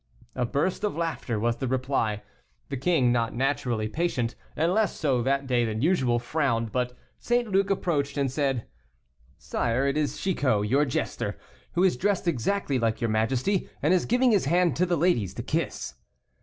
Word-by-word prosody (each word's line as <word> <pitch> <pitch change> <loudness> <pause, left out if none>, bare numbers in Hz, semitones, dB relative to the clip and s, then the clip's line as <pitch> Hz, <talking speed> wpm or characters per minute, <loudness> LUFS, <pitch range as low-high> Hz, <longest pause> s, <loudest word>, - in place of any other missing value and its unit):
A 125 -2 0
burst 155 - -1
of 205 -6 -1
laughter 160 -9 -2
was 115 +2 0
the 130 - -2
reply. 125 -5 -1 0.5
The 140 - -3
king, 135 -3 +2
not 115 -2 0
naturally 125 -4 0
patient, 125 -3 -1 0.2
and 165 +3 +1
less 215 0 +1
so 135 -5 +1
that 135 +2 0
day 125 -2 +2
than 110 +1 -2
usual, 135 -9 +2
frowned; 120 -3 -1
but 125 +1 -2 0.2
St. 240 0 +1
Luc 195 -1 +2
approached, 155 -8 0
and 135 -2 +1
said: 135 -4 -1 0.7
"Sire, 120 +4 -1
it 140 +1 +1
is 150 -1 -1
Chicot, 130 - +1
your 140 +6 +3
jester, 130 - -2 0.4
who 180 - +2
is 185 -9 +3
dressed 195 +2 0
exactly 145 - 0
like 115 -1 0
your 115 -3 0
majesty, 130 - 0
and 155 +5 +4
is 180 - +2
giving 250 +1 +3
his 200 -9 +3
hand 175 +3 +2
to 180 +2 +2
the 175 -1 +1
ladies 145 - +1
to - - -4
kiss." - - -2
135 Hz, 180 wpm, -26 LUFS, 120-175 Hz, 0.7 s, and